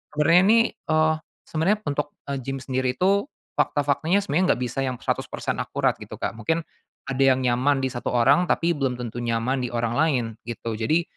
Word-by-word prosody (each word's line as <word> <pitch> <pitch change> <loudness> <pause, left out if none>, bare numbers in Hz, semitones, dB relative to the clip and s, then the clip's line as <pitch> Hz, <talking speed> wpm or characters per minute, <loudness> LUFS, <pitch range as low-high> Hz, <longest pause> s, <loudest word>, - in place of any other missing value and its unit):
sebenernya 165 +4 +5
nih, 230 +2 +6 0.2
eee, 155 0 +2 0.3
sebenernya 165 +7 +1
untuk, 145 +1 -3 0.2
eee, 140 - -2
gim 135 +2 -4
sendiri 130 0 -1
itu 200 - +2 0.3
fakta-faktanya 155 +7 +1
sebenernya 185 0 +2
nggak 125 - -8
bisa 125 +2 -3
yang 130 -1 -1
100% - - -2
akurat - - 0
gitu, - - -9
Kak. - - -2
Mungkin 160 +10 -1 0.4
ada 135 0 +1
yang 130 -1 +4
nyaman 130 +3 +2
di 130 - +2
1 120 -1 -4
orang 140 +9 +4
tapi 170 +1 +2
belum 135 -3 -1
tentu 120 0 -5
nyaman 120 +3 0
di - - -4
orang 120 0 -1
lain, 145 -6 +2 0.2
gitu. 115 -1 -4
Jadi, 155 +10 +1
135 Hz, 185 wpm, -24 LUFS, 125-160 Hz, 0.4 s, nih